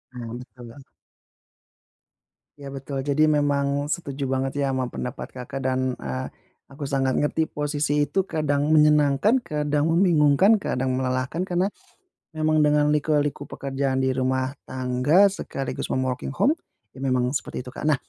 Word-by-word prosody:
Oh, 115 -2 -6
gitu 125 0 -14
ya. 115 - -16 1.8
Ya, 140 -1 -8
betul. 135 0 -5
Jadi 155 +2 +3
memang 145 -1 +1
setuju 145 -3 -3
banget, 135 +1 -1
ya 135 - -1
sama 130 -1 -1
pendapat 125 -1 -6
Kakak. 130 +2 -7
Dan, 130 -1 0
eee, 65 -1 -4 0.4
aku 140 0 -7
sangat 135 -2 +1
ngerti 155 +3 +1
posisi 150 -1 -1
itu 190 -1 0
kadang 150 -2 0
menyenangkan, 150 - +4
kadang 150 -1 0
membingungkan, 170 +3 +5
kadang 130 -9 -1
melelahkan. 130 +6 -1
Karena, 185 +1 0 0.7
memang 155 0 +2
dengan 150 0 +3
liku-liku 145 -1 0
pekerjaan 135 -1 -2
di 130 - +2
rumah 130 0 0 0.2
tangga, 130 +9 +3
sekaligus, 135 -8 -4
mom 130 - 0
working 130 +1 -3
home, 265 - +3 0.4
ya 130 - -14
memang 130 -2 +1
seperti 140 - -3
itu, 125 - -9
Kak. 130 - -7
Nah, 155 - +4
140 Hz, 145 wpm, -24 LUFS, 130-150 Hz, 1.8 s, membingungkan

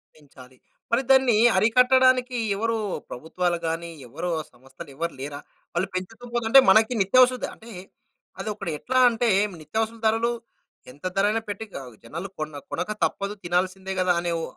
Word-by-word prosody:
పెంచాలి. 130 -4 -17 0.3
మరి 235 +2 +3
దాన్ని 265 -3 +5 0.2
అరికట్టడానికి 250 +3 +4 0.2
ఎవరు 230 +2 -1 0.3
ప్రభుత్వాలు 175 +6 -2
గాని 165 +1 -3 0.2
ఎవరు 165 +8 -5
ఆ - - -9
సంస్థలు 130 +3 -13
ఎవరు 170 +4 -3
లేరా? 145 +1 -6 0.3
వాళ్ళు 175 +3 0
పెంచుతూ 185 +6 -6
పోతుంటే 240 +2 +6
మనకి 220 +5 +5
నిత్యావస 255 +6 +5
ద - - +2
అంటే 230 +1 -14 0.7
అది - - -4
ఒకడ 200 - -8
ఎట్లా 255 +1 0
అంటే 235 0 0 0.3
నిత్యావసర 220 +9 -3
ధరలు 225 +2 +2 0.6
ఎంత 145 +6 -15
ధర 195 +1 +3
అయినా 225 +1 0
పెట్టి 215 +2 -5 0.2
ఆహ్, 125 -3 -12
జనాలు 165 +11 -7
కొన్న 155 -1 -5 0.2
కొనక - - -3
తప్పదు. 200 +1 -3
తినాల్సిందే 185 +2 -1
గదా! 180 -1 +3
అనే 175 0 -2
ఓ - - -4
195 Hz, 155 wpm, -24 LUFS, 165-230 Hz, 0.7 s, పోతుంటే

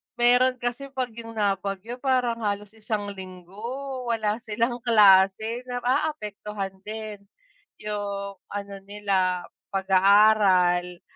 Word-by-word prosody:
meron 245 +1 +4
kasi 245 +3 -3
pag 255 -1 -1
'yung 230 0 -9
nabagyo 200 +2 -2
parang 250 -3 +1
halos 205 0 -2
isang 210 -2 -3
linggo 215 +9 -7
wala 220 -2 0
silang 230 +2 -1
klase. 215 +1 +4
Naaapektuhan 210 -6 -2
din 215 -1 -6 0.6
'yung 200 -1 -4
ano 200 0 -6
nila 195 -3 0 0.3
pag-aaral 190 -2 +4
210 Hz, 95 wpm, -25 LUFS, 195-235 Hz, 0.6 s, meron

